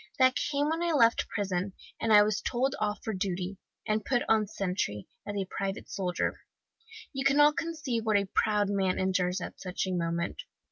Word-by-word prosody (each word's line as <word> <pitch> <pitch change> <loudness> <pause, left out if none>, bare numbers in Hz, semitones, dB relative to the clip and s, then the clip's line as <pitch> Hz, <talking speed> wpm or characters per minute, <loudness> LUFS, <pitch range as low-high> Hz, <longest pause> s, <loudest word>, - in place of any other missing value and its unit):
That 260 -1 +5
came 290 0 0
when 325 +1 -1
I 340 -1 +1
left 235 -5 +4
prison, 195 -2 -2 0.3
and 225 - 0
was 215 0 0
told 260 +2 0
off 210 -1 -2
for 220 - -2
duty, 185 0 -3 0.3
and 215 0 0
put 245 +1 +1
on 215 -2 +3
sentry, 180 - -2 0.2
as 205 - -3
a 195 -1 -1
private 195 +1 -4
soldier. 180 -3 -1 0.7
You 270 0 -2
can 275 +1 +3
not 295 0 +6
conceive 295 -9 -2
what 215 -2 +3
a 200 - +1
proud 210 -1 +2
man 195 -2 +1
endures 185 -1 +1
at - - -7
such 185 0 -2
a 190 - -3
moment. 170 -1 -1
205 Hz, 185 wpm, -29 LUFS, 185-250 Hz, 0.7 s, not